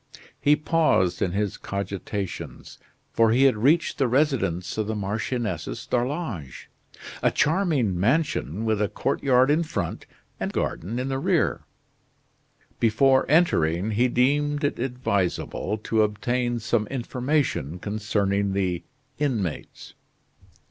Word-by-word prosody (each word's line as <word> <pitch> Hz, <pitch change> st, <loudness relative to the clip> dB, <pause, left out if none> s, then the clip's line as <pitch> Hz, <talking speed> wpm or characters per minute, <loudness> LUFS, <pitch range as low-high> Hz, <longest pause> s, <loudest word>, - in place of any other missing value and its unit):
He 145 Hz, +1 st, +4 dB
paused 150 Hz, -, +1 dB
in 90 Hz, -, 0 dB
his 100 Hz, -1 st, -1 dB
cogitations, 100 Hz, 0 st, -5 dB, 0.3 s
for 115 Hz, -1 st, +4 dB
he 125 Hz, +4 st, +4 dB
had 135 Hz, -4 st, +5 dB
reached 145 Hz, +10 st, +2 dB
the 135 Hz, -, +3 dB
residence 120 Hz, -, 0 dB
of 110 Hz, -, -1 dB
the 110 Hz, -, -2 dB
Marchioness 105 Hz, +3 st, -3 dB
d'Arlange 120 Hz, -, -3 dB, 0.5 s
a -, -, +4 dB
charming 150 Hz, -, +1 dB
mansion 115 Hz, -, 0 dB
with 110 Hz, -2 st, +1 dB
a 105 Hz, -, +1 dB
courtyard 130 Hz, +3 st, +2 dB
in 155 Hz, +3 st, +3 dB
front 100 Hz, -, -4 dB, 0.3 s
and -, -, -2 dB
garden 100 Hz, +9 st, -3 dB
in 130 Hz, +2 st, -2 dB
the 135 Hz, 0 st, -1 dB
rear. -, -, +1 dB, 1.1 s
Before 130 Hz, +4 st, +3 dB
entering, 105 Hz, -, +2 dB
he 120 Hz, +4 st, +3 dB
deemed 145 Hz, +4 st, +1 dB
it 145 Hz, -, 0 dB
advisable 110 Hz, -5 st, -1 dB
to 110 Hz, -1 st, +2 dB
obtain 120 Hz, +3 st, 0 dB
some 110 Hz, -1 st, 0 dB
information 125 Hz, -, -1 dB
concerning 100 Hz, -1 st, -1 dB
the 90 Hz, -3 st, -1 dB, 0.4 s
inmates. 115 Hz, -, -3 dB
115 Hz, 120 wpm, -25 LUFS, 100-135 Hz, 1.1 s, had